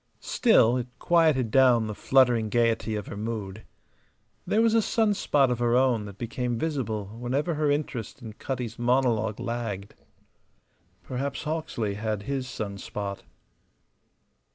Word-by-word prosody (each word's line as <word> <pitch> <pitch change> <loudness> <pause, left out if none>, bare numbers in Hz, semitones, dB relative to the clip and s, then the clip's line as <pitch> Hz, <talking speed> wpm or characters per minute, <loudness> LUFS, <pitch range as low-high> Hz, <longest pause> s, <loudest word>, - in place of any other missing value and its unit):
Still, 125 - +4
it 125 -1 -3
quieted 155 -9 +2
down 125 -3 +5
the 105 - -4
fluttering 120 -1 +3
gayety 115 -1 +1
of 105 -2 -4
her - - -7
mood. 105 -2 -5 0.9
There 220 +2 +3
was 225 -1 +3
a 225 - +4
sun 220 0 +2
spot 140 -8 +2
of 120 - -1
her 120 0 +2
own 125 -4 +2
that 100 -1 -10
became 120 +1 -3
visible 120 -8 -2
whenever 135 +7 -1
her 150 -1 0
interest 140 -5 -2
in 115 -4 -9
Cutty's 120 -1 -5
monologue 120 -3 +1
lagged. 115 -5 -4 1.1
Perhaps 130 +7 -4
Hawksley 150 -9 -2
had 105 0 -3
his 135 +1 -3
sun 100 -4 -5
spot. 100 -1 -5
120 Hz, 140 wpm, -26 LUFS, 110-135 Hz, 1.1 s, down